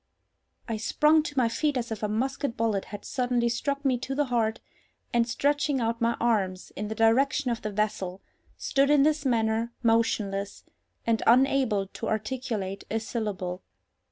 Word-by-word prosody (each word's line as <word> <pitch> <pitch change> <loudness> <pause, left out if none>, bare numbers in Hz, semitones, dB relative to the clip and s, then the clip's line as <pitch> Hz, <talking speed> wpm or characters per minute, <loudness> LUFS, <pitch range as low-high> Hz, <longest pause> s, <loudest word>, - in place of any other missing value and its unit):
I 225 -2 -2
sprung 300 +8 +3
to 290 -2 -7
my 250 -3 +4
feet 290 +4 0
as 235 -2 -3
if 220 - -4
a 210 - 0
musket 250 +3 -2
bullet 220 -3 0
had 205 -1 -9
suddenly 245 -2 0
struck 280 +4 -2
me 255 -2 +2
to 270 +2 -4
the 295 +1 +2
heart; 220 -2 +1 0.5
and, 235 0 +2
stretching 285 +3 +1
out 230 0 -1
my 235 0 +1
arms 195 -6 0
in 210 - -4
the 220 - -4
direction 250 +4 +3
of 235 - -3
the 215 - -3
vessel, 200 -3 -2 0.4
stood 275 0 +1
in 290 -2 +5
this 300 -1 +1
manner, 225 -1 +1
motionless, 210 -3 0 0.4
and 230 -1 +1
unable 250 -4 +4
to 195 - -7
articulate 215 -3 -3
a 225 - 0
syllable. 200 -5 -4
230 Hz, 165 wpm, -27 LUFS, 215-265 Hz, 0.5 s, in